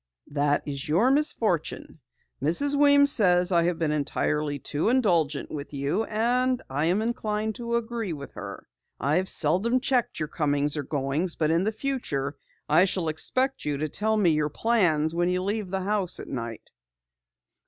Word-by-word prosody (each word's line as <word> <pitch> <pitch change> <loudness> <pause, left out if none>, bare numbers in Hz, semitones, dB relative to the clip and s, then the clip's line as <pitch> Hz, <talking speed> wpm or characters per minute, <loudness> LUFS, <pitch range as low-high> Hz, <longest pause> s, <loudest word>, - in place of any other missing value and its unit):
"That 145 0 +1
is 140 -1 -5
your 205 +12 +3
misfortune. 225 - 0 0.4
Mrs. 170 - +3
Weems 285 0 +5
says 180 -5 +4
I 170 -1 +3
have 175 -1 0
been 160 -3 -1
entirely 150 0 -1
too 145 +7 -1
indulgent 170 - +1
with 145 -1 -7
you, 140 +10 -1
and 250 +3 0
I 145 +4 0
am 190 +5 +1
inclined 220 -2 -2
to 235 -1 -3
agree 230 -4 -3
with 140 -3 -7
her. - - -9 0.3
I've 175 +7 0
seldom 190 +11 +2
checked 255 -2 0
your 155 - -2
comings 145 -1 0
or 150 - -2
goings, 145 +5 -1
but 155 -1 0
in 170 +3 +1
the 215 - +1
future 215 - -3 0.3
I 160 +5 +5
shall 180 -4 0
expect 255 - 0
you 145 -1 -2
to 155 +2 -3
tell 220 +7 -1
me 185 -6 +3
your 150 -1 0
plans 165 -6 +1
when 175 +1 0
you 180 0 -1
leave 205 0 -3
the 190 +1 -2
house 195 -2 -1
at - - -8
night." 115 -3 -7
175 Hz, 170 wpm, -26 LUFS, 150-225 Hz, 0.4 s, Weems